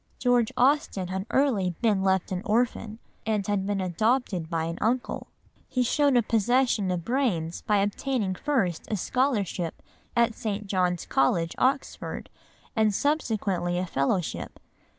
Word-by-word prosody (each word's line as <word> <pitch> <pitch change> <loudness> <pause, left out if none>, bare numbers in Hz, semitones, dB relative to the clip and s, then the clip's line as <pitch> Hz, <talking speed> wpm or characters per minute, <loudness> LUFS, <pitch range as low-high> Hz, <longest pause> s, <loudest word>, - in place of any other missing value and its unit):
George 245 -3 +2
Austen 250 -9 +2
had 190 +2 -3
early 210 -11 +2
been 215 -5 +2
left 190 -1 +1
an 180 -1 -2
orphan, 225 -1 0 0.3
and 215 -3 0
had 200 -1 -1
been 205 -1 0
adopted 190 -1 0
by 165 -1 -1
an 165 +1 -4
uncle. 240 +4 -1 0.4
He 255 - +1
showed 285 +2 +3
the 240 - +5
possession 230 -2 +2
of 180 -2 -2
brains 215 -11 0
by 210 - +2
obtaining 205 +1 0
first 185 - -1
a 215 - -1
scholarship 205 - -1 0.4
at 235 -1 +3
St. 215 -3 -3
John's 180 -3 0
College, 165 +5 +1
Oxford, 270 +2 -1 0.4
and 215 -2 +3
subsequently 205 - 0
a 180 - 0
fellowship. 160 +2 -2
205 Hz, 140 wpm, -27 LUFS, 180-245 Hz, 0.4 s, the